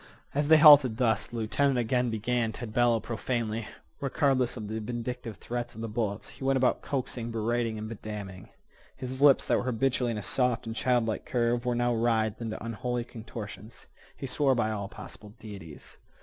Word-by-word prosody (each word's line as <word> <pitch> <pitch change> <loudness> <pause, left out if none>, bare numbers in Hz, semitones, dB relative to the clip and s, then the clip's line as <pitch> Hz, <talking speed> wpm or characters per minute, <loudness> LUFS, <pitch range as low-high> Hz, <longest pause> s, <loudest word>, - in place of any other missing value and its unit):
As 145 +1 0
they 160 +1 +8
halted 145 -7 +8
thus 115 -3 +1
the - - -10
lieutenant 130 +5 +1
again 125 +1 +1
began 115 +1 0
to 120 - -6
bellow 120 +1 +2
profanely. 115 -1 -3 0.3
Regardless 135 -3 +1
of 110 -2 -5
the 110 +1 -3
vindictive 120 -1 -5
threats 120 +1 -5
of 110 - -7
the 115 - -3
bullets, 105 -2 -2
he - - -11
went 135 0 +3
about 130 -1 +2
coaxing, 125 -4 -3
berating, 115 0 -1
and 110 0 -5
bedamning. 105 -4 -7 0.5
His 130 +1 -6
lips, 140 -2 +6
that - - +2
were - - -4
habitually 125 0 +1
in 115 - -2
a 105 - -5
soft 125 0 0
and 115 0 -5
childlike 120 -3 +1
curve, 120 -1 0
were 120 - +1
now 120 0 +1
writhed 110 -1 +1
into 115 -1 -5
unholy 120 +2 -2
contortions. 110 -2 -9 0.3
He - - -5
swore 135 +1 +2
by 110 -2 +1
all 100 -2 -4
possible 105 +1 -11
deities. 95 -8 -10
120 Hz, 180 wpm, -29 LUFS, 110-125 Hz, 0.5 s, they